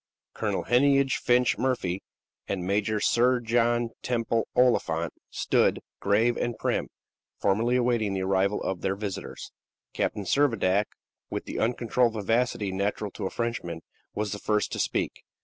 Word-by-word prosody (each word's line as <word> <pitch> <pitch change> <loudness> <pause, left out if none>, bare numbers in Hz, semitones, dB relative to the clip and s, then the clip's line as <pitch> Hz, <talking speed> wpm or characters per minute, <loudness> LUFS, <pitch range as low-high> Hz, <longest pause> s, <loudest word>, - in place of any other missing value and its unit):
Colonel - - -1
Heneage 135 +1 +3
Finch 125 0 +2
Murphy 100 -8 0 0.5
and 95 -3 -2
Major 105 +2 +1
Sir 125 +4 +3
John 120 0 +1
Temple 115 -2 0
Oliphant 85 -10 +2 0.2
stood, - - +2 0.2
grave 115 +4 +2
and 120 -1 -2
prim, - - -1 0.5
formally 110 +5 +2
awaiting 120 -5 +1
the 95 - -1
arrival 95 +2 +1
of 95 -2 -2
their 95 - 0
visitors. 100 -2 -6 0.4
Captain 105 - -1
Servadac, 105 -6 +2 0.4
with - - -4
the - - -4
uncontrolled 120 0 +1
vivacity 110 -1 0
natural 100 +2 -2
to 95 - -4
a - - -4
Frenchman, 115 -9 -3 0.3
was 105 0 -2
the 105 - -4
first 105 0 0
to - - -3
speak. - - -1
110 Hz, 140 wpm, -27 LUFS, 100-120 Hz, 0.5 s, Heneage